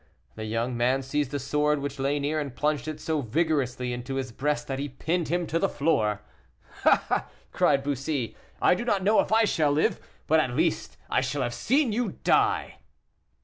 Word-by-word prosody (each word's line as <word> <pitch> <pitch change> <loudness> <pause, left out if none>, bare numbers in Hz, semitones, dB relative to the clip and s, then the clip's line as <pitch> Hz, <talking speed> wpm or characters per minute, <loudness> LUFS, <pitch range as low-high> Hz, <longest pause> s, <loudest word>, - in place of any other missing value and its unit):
The 110 - -6
young 115 +3 -1
man 125 +3 +1
seized 140 0 -1
a 145 - -1
sword 150 +2 +1
which 140 -1 -5
lay 140 +2 +1
near, 150 +2 -1
and 140 -4 -5
plunged 150 +1 0
it 155 -1 -4
so 155 -1 -1
vigorously 130 -2 0
into 125 +2 -5
his 130 -2 -3
breast, 145 +4 -1
that 135 -2 -4
he 145 +1 -3
pinned 165 +6 -2
him 175 +1 0
to 165 +1 -1
the 195 - +1
floor. 110 -9 +1 0.6
"Ah!" - - +3 0.2
cried 135 - +2
Bussy, 135 -4 -2 0.2
"I - - +5
do 180 - -2
not 205 -5 0
know 210 +3 +4
if - - +1
I 225 +1 +5
shall 155 -7 +2
live, 150 +2 +1 0.3
but 160 +1 +4
at 130 -5 0
least 165 +3 0
I - - +1
shall - - -1
have - - -2
seen 270 -2 +2
you 240 +3 -1
die!" - - +2
145 Hz, 195 wpm, -27 LUFS, 130-160 Hz, 0.6 s, I